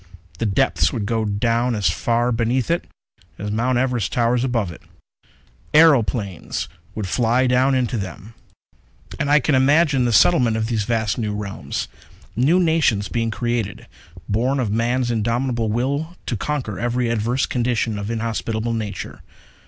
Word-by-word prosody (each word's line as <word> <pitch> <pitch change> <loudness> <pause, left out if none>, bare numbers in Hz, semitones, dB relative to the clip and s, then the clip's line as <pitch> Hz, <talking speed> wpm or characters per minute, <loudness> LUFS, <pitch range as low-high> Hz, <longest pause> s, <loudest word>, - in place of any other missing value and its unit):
The 115 - 0
depths 95 - +2
would 105 - -3
go 110 +1 0
down 115 +4 0
as 105 -2 +1
far 120 +1 0
beneath 120 +4 0
it 170 - -1 0.5
as 105 +1 -4
Mount 120 +4 +1
Everest 125 -4 0
towers 120 0 +1
above 115 -8 -1
it. 80 - -12 0.9
Aeroplanes 120 - +3 0.3
would 105 -3 -3
fly 120 +5 +2
down 130 +2 +3
into 125 -3 0
them._ 95 +3 -7 0.9
_And - - 0
I 150 +1 +6
can 145 +2 0
imagine 140 0 +3
the 120 - +1
settlement 115 - +4
of 110 - -1
these 110 -3 -1
vast 110 -1 0
new 105 -2 -2
realms: 100 -1 -4 0.5
New 130 +8 +3
little 185 - +4
nations 145 - +2
being 115 +1 -1
created, 115 -3 -3 0.4
born 125 +6 0
of 115 -5 -1
man's 120 +3 0
indomitable 115 +1 0
will 140 +9 -2
to 120 - -2
conquer 120 -4 -3
every 120 +1 0
adverse 115 +3 0
condition 120 -3 -1
of 100 +1 -5
inhospitable 115 0 -2
nature. 110 -3 -5
120 Hz, 150 wpm, -21 LUFS, 110-125 Hz, 0.9 s, I